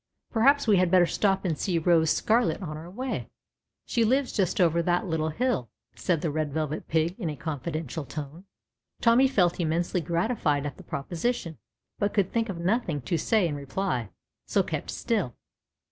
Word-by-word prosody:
"Perhaps 275 +4 +4
we 205 -3 +5
had 180 -1 +3
better 180 0 +6
stop 195 +3 +1
and 165 -3 +1
see 175 +2 -1
Rose 165 -1 +3
Scarlet 230 +7 +2
on 155 -3 -5
our 160 +3 -8
way. 255 +8 -4 0.6
She 235 - +1
lives 260 +4 +2
just 190 -4 0
over 170 -2 +4
that 175 +1 +1
little 160 -3 -1
hill," 210 - -1 0.2
said 170 -4 0
the 160 - -1
Red 155 -1 -1
Velvet 155 0 -3
Pig 160 +2 +1
in 175 -7 -2
a 150 - -4
confidential 155 0 -4
tone. 150 +5 -7 0.5
Tommy 240 +3 +5
felt 180 -10 +2
immensely 170 +2 0
gratified 165 - 0
at 145 - -5
the - - -12
proposition, 170 - -3 0.4
but 205 0 0
could 195 -3 +2
think 230 -1 0
of 190 - -4
nothing 175 - 0
to 170 - -1
say 190 +4 +2
in 155 - -3
reply, 140 - -2 0.4
so - - +2
kept - - -4
still. - - -1
170 Hz, 175 wpm, -27 LUFS, 155-205 Hz, 0.6 s, better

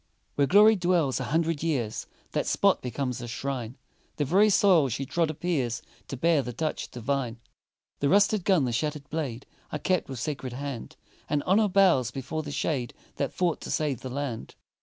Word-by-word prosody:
Where 140 -1 +2
Glory 210 +5 +7
dwells 175 -7 +1
a - - -3
hundred 165 -1 0
years, 135 -10 -2 0.2
That - - -1
spot - - +3
becomes 125 0 -3
a 120 - -6
shrine, 125 0 -4 0.4
The 145 - 0
very 195 +9 +4
soil 185 -8 +4
she 125 +4 -3
trod 165 +4 0
appears 145 -8 -2 0.2
To 135 - -5
bear 160 +2 +3
the 125 -2 -6
touch 155 +6 -3
divine; 125 -1 -2 0.6
The 140 - +1
rusted 205 +1 +4
gun, 180 -7 +3
the 125 - -1
shattered 150 +3 -2
blade, 140 -6 -3 0.3
Are - - -2
kept 185 +1 0
with 135 - -5
sacred 130 0 -4
hand, 135 -2 -6 0.3
And 145 -1 0
Honor 210 +4 +3
bows 180 - +4
before 135 +4 -4
the 150 - -7
shade 135 -5 -2 0.2
That 140 - -1
fought 175 -3 0
to - - -7
save 145 -6 -1
the 130 - -6
land. 130 -3 -5
145 Hz, 180 wpm, -27 LUFS, 130-170 Hz, 0.6 s, Glory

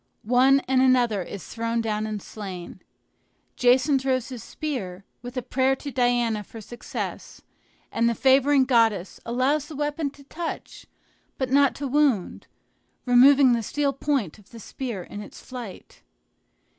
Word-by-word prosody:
One 255 +4 +4
and 260 0 +1
another 245 -6 +3
is 185 +1 -8
thrown 230 0 -2
down 215 -1 -1
and 215 -1 -4
slain. 185 -4 -8 0.7
Jason 260 +3 +3
throws 260 -1 -1
his 250 -4 -8
spear, 200 -11 -5 0.2
with 245 +2 -8
a 250 - -2
prayer 260 +2 +1
to 280 +1 -7
Diana 240 -3 +1
for 225 - -11
success; 235 +3 -7 0.5
and 230 +1 +2
the 235 - -1
favoring 270 +1 +4
goddess 225 -7 +2
allows 270 +5 +1
the 315 - -9
weapon 295 +1 -2
to 280 0 -17
touch, 325 +4 -7 0.5
but 260 -1 -2
not 280 0 +4
to 285 - -4
wound, 270 -8 +1 0.6
removing 260 +1 +6
the 235 - 0
steel 280 +5 -1
point 270 - -2
of 205 - -21
the 230 - -12
spear 225 -3 -6
in 205 - -8
its 205 - -11
flight. 245 -7 -10
250 Hz, 150 wpm, -25 LUFS, 225-275 Hz, 0.7 s, removing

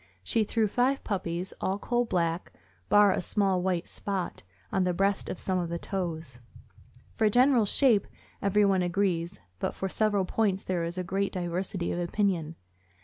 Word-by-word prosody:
She 220 - +1
threw 220 +1 +1
five 255 +6 +1
puppies, 180 -2 -3
all 190 +1 0
coal 240 +3 0
black, 170 -4 -1 0.4
bar 205 -1 +6
a - - 0
small 190 0 +1
white 180 -2 -1
spot 195 -3 -4 0.3
on 190 - +2
the 180 -1 0
breast 195 +2 0
and - - -4
some 185 +1 -1
on 175 -1 -2
the 170 - -2
toes. 165 -9 -4 0.7
For 220 -1 +2
general 245 -1 +4
shape, 230 -4 +4 0.3
everyone 200 -1 +3
agrees; 175 - 0 0.2
but - - -2
for 190 - -3
several 205 -1 +1
points 195 -1 0
there 180 -2 -1
is 170 +2 -4
great 195 +3 -1
diversity 180 0 -2
of 175 - -2
opinion. 175 -3 0
190 Hz, 160 wpm, -28 LUFS, 175-205 Hz, 0.7 s, bar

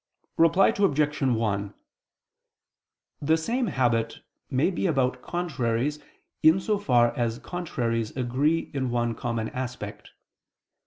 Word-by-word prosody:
Reply 165 +4 +5
Obj. 150 -7 +1
1: 105 -6 0 1.5
The 160 +3 +3
same 235 +9 -1
habit 115 - 0 0.3
may 140 +7 +2
be 185 - -1
about 130 -5 0
contraries 145 -5 -1 0.4
in 160 +4 +6
so 210 +2 0
far 120 -10 +3
as 115 -1 -1
contraries 120 -9 -2
agree 135 +6 0
in 130 -2 -1
one 120 -1 0
common 115 -1 -3
aspect. 125 -5 -6
130 Hz, 110 wpm, -26 LUFS, 120-160 Hz, 1.5 s, in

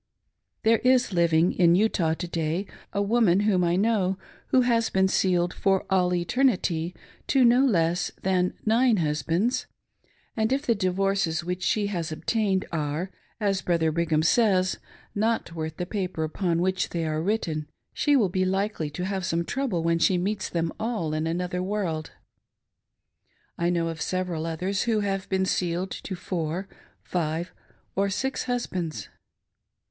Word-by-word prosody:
There 225 0 +4
is 255 -4 +3
living 170 0 +3
in 175 -1 +4
Utah, 180 -5 +2
to 175 - -5
day, 165 +3 -2 0.3
a 200 - 0
woman 205 -3 +3
whom 200 -4 +2
I 170 0 +2
know, 195 -2 +1 0.3
who 255 - +4
has 235 -2 +2
been 190 0 +3
sealed 180 -2 +1
"for 195 -1 +1
all 180 -2 +3
eternity'' 180 -4 +1 0.3
to 265 -3 +4
no 245 +3 +5
less 175 -8 +2
than 180 -1 +1
nine 230 +1 +4
hus 150 -3 0
bands; 175 - 0 0.7
and 220 +1 0
if 275 +3 0
the 235 - +3
divorces 190 -4 0
which 180 +1 -3
she 205 +3 +1
has 165 -3 -3
obtained 195 +3 0
arc, 155 +3 -2 0.3
as 200 -3 0
Brother 165 -2 +1
Brigham 160 -1 +1
says, 185 -1 +3 0.3
not 220 -4 0
worth 160 -1 -5
the 180 - -2
paper 185 -4 -3
upon 170 +2 0
which 185 0 0
they 165 -1 -2
are 155 0 -1
written, 165 -6 -1 0.3
she 290 -1 +2
will 230 -7 +4
be 185 +1 0
likely 190 -4 -1
to 180 +5 -4
have 190 -1 -2
some 170 -2 -1
trouble 245 -11 -1
when 165 0 +2
she 180 +3 +3
meets 195 +2 -2
them 165 -1 -1
all 215 -9 -2
in 155 +1 -1
another 180 +2 -2
world. 185 -5 -2 1.5
I 170 0 0
know 170 -1 +1
of 165 -1 -6
several 180 -3 -2
others 185 +4 -1
who 225 -3 +1
have 195 -1 -2
been 190 0 +1
sealed 180 0 -1
to 190 - -5
four, 175 +1 -3 0.4
five, 170 0 -2 0.4
or 200 +1 +1
six 265 +7 -2
husbands! 185 -10 -3
185 Hz, 160 wpm, -26 LUFS, 170-205 Hz, 1.5 s, no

